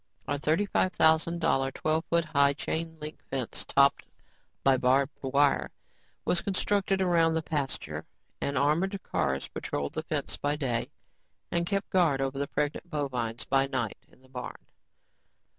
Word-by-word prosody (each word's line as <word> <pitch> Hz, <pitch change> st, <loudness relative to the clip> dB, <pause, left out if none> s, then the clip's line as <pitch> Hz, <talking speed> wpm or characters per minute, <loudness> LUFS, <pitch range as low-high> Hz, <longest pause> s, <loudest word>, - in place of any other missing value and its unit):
A 145 Hz, 0 st, -1 dB
thirty 160 Hz, +7 st, +2 dB
five 185 Hz, -2 st, +1 dB
thousand 160 Hz, +2 st, +3 dB
dollar, 135 Hz, -3 st, +2 dB
twelve 155 Hz, +4 st, -1 dB
foot 170 Hz, 0 st, +1 dB
high 140 Hz, -2 st, +3 dB
chain 160 Hz, +3 st, -3 dB
link 150 Hz, 0 st, -7 dB
fence, 130 Hz, -3 st, -3 dB
topped 140 Hz, 0 st, +3 dB, 0.6 s
by 135 Hz, -1 st, +5 dB
barbed 130 Hz, +2 st, +3 dB
wire, 140 Hz, +1 st, +2 dB, 0.6 s
was 175 Hz, -, +1 dB
constructed 195 Hz, 0 st, +1 dB
around 165 Hz, -3 st, +3 dB
the 160 Hz, -, 0 dB
pasture 145 Hz, -4 st, -3 dB, 0.3 s
and 140 Hz, -, -1 dB
armored 170 Hz, +8 st, +2 dB
cars 70 Hz, -1 st, -1 dB
patrolled 70 Hz, 0 st, -3 dB
the -, -, -2 dB
fence 155 Hz, -3 st, -3 dB
by 145 Hz, +1 st, 0 dB
day 125 Hz, -6 st, -1 dB, 0.6 s
and 170 Hz, 0 st, +1 dB
kept 200 Hz, 0 st, -1 dB
guard 165 Hz, -7 st, +3 dB
over 135 Hz, 0 st, -1 dB
the 140 Hz, -, -1 dB
pregnant 150 Hz, +5 st, -2 dB
bovines 125 Hz, -7 st, -2 dB
by 135 Hz, 0 st, +2 dB
night 130 Hz, -6 st, -2 dB
in 130 Hz, -, -24 dB
the -, -, -19 dB
barn. 125 Hz, -1 st, -7 dB
145 Hz, 155 wpm, -29 LUFS, 135-165 Hz, 0.6 s, by